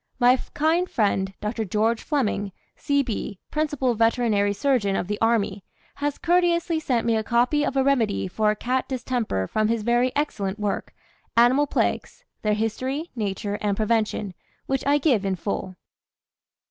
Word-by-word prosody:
My 250 0 +5 0.2
kind 325 +4 +2
friend, 195 -3 +1
Dr. 220 +2 -2
George 220 +3 0
Fleming, 210 - -1 0.2
C.B., 275 -8 -1
principal 295 -5 0
veterinary 225 -3 +2
surgeon 205 -3 +1
of 180 - -2
the 210 +1 -3
army, 210 -4 +1 0.3
has 290 0 -2
courteously 340 -1 +2
sent 245 -7 0
me 230 -1 +2
a 220 - 0
copy 245 +7 +2
of 275 - -1
a 265 - +4
remedy 235 -9 +1
for 215 +3 +1
cat 255 +4 -1
distemper 245 - -1
from 215 - 0
his 225 -1 0
very 240 +2 +2
excellent 205 -9 -1
work, 210 -1 -3 0.4
"Animal 255 +5 +5
Plagues: - - -1 0.2
their 210 -1 +1
History, 255 +9 -2
Nature, 205 -1 -3
and 205 -2 0
Prevention," 215 -3 0 0.3
which 270 -1 -1
I 290 +1 +4
give 265 -8 +2
in 195 -1 0
full. 185 0 -4
230 Hz, 150 wpm, -24 LUFS, 210-275 Hz, 0.4 s, My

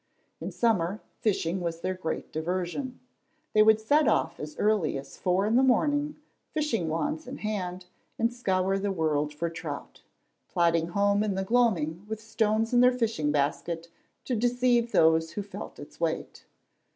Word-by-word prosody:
In - - -5
summer, 205 -4 +1 0.2
fishing 190 -5 0
was 170 -1 -3
their 185 +1 -1
great 180 -3 -4
diversion. 180 - -3 0.5
They 215 - +6
would 220 0 +6
set 290 +8 +3
off 165 +1 +1
as 150 0 -7
early 205 -9 +2
as 135 - -9
four 185 +2 +1
in 220 +2 +2
the - - +6
morning, 290 +3 +2 0.3
fishing 245 - -1
wands 300 - -2
in 265 +2 -6
hand, 185 -4 -3 0.3
and 230 +1 +1
scour 195 -4 0
the 200 0 -1
world 150 -4 0
for 150 +3 -2
trout, 165 -3 -7 0.5
plodding 170 -1 +2
home 200 +3 +2
in 210 -2 0
the 190 - -1
gloaming 190 -7 +1
with 220 -1 -3
stones 220 +1 0
in 245 - +5
their 250 +1 +7
fishing 215 -11 0
basket 165 +4 -1 0.4
to 255 - -1
deceive 240 0 +2
those 160 0 +4
who 205 - -3
felt 200 +1 -8
its 145 - -12
weight. 165 -1 -3
195 Hz, 165 wpm, -28 LUFS, 165-230 Hz, 0.5 s, their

